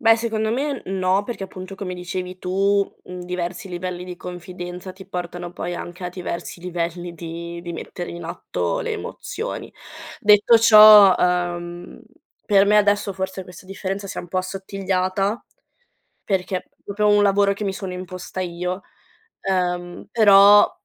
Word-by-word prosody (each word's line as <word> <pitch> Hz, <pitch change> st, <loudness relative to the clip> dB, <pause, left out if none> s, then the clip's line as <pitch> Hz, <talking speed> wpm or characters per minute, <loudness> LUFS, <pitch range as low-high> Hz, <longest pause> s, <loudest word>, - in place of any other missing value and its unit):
Beh, 225 Hz, -3 st, +6 dB
secondo 220 Hz, -1 st, -1 dB
me, 275 Hz, +1 st, -2 dB
n 190 Hz, +1 st, -3 dB
no, 185 Hz, +2 st, +2 dB
perché, 205 Hz, -2 st, -5 dB
appunto, 185 Hz, 0 st, -9 dB
come 185 Hz, -2 st, -5 dB
dicevi 180 Hz, +1 st, -5 dB
tu, 195 Hz, +2 st, +1 dB
mhmm, 180 Hz, 0 st, -8 dB
diversi 180 Hz, +1 st, -4 dB
livelli 180 Hz, 0 st, -5 dB
di 180 Hz, -1 st, -8 dB
confidenza 180 Hz, +1 st, -8 dB
ti 190 Hz, +1 st, -13 dB
portano, 175 Hz, -1 st, -6 dB
poi, 175 Hz, 0 st, -4 dB
anche 175 Hz, +1 st, -7 dB
a -, -, -2 dB
diversi 175 Hz, -1 st, -6 dB
livelli 175 Hz, 0 st, -4 dB
di 170 Hz, +1 st, -7 dB
di 175 Hz, -1 st, -6 dB
mettere 175 Hz, +1 st, -6 dB
in 170 Hz, 0 st, -8 dB
atto 90 Hz, -, -3 dB
le -, -, -3 dB
emozioni. -, -, -6 dB, 0.5 s
Detto 210 Hz, +2 st, +6 dB
ciò, 215 Hz, -3 st, +9 dB
ehm, 175 Hz, -1 st, -2 dB, 0.4 s
per 200 Hz, -2 st, +4 dB
me, 210 Hz, +1 st, +4 dB
adesso, 205 Hz, -1 st, +3 dB
forse, 190 Hz, 0 st, -4 dB
questa 180 Hz, +1 st, -13 dB
differenza 195 Hz, +1 st, -4 dB
si -, -, -5 dB
è -, -, -1 dB
un 175 Hz, -, -12 dB
po' 185 Hz, -, -1 dB
assottigliata, 195 Hz, +2 st, -2 dB, 0.8 s
perché 190 Hz, -1 st, -1 dB
è -, -, -15 dB, 0.2 s
proprio 210 Hz, +1 st, 0 dB
un 205 Hz, 0 st, +5 dB
lavoro 200 Hz, 0 st, +3 dB
che 200 Hz, +1 st, -5 dB
mi 195 Hz, -, -1 dB
sono 190 Hz, -1 st, -6 dB
imposta 185 Hz, 0 st, -7 dB
io. 180 Hz, +1 st, -3 dB, 0.6 s
Ehm, 180 Hz, -2 st, -2 dB
però, 205 Hz, -2 st, +7 dB
185 Hz, 160 wpm, -22 LUFS, 175-200 Hz, 0.8 s, ciò